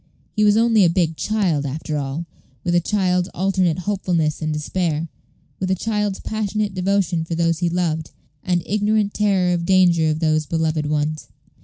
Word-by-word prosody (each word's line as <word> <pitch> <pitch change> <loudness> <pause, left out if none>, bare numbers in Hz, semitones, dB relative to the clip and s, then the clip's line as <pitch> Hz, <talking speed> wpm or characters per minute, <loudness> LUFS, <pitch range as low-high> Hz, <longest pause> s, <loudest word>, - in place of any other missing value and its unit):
He 210 - +2
was 210 0 +5
only 225 -2 +4
a 175 - +5
big 165 -2 +1
child 185 -7 0
after 150 +2 -4
all, 145 +3 -3 0.4
with 175 - 0
a 175 - +5
child's 180 -1 0
alternate 185 -2 +1
hopefulness 180 -5 -1
and 155 0 -1
despair; 155 +1 -2 0.5
with 185 - -2
a 190 - +2
child's 210 0 -2
passionate 215 -1 -2
devotion 185 -2 0
for 165 +1 -4
those 165 -1 +1
he 175 -1 +1
loved, 165 -3 -1 0.3
and 175 -2 0
ignorant 210 0 +1
terror 195 -4 +2
of 170 -1 -1
danger 170 -3 +4
to 155 - -1
those 155 -2 +1
beloved 160 -2 0
ones. 150 +1 -1
175 Hz, 170 wpm, -21 LUFS, 160-195 Hz, 0.5 s, was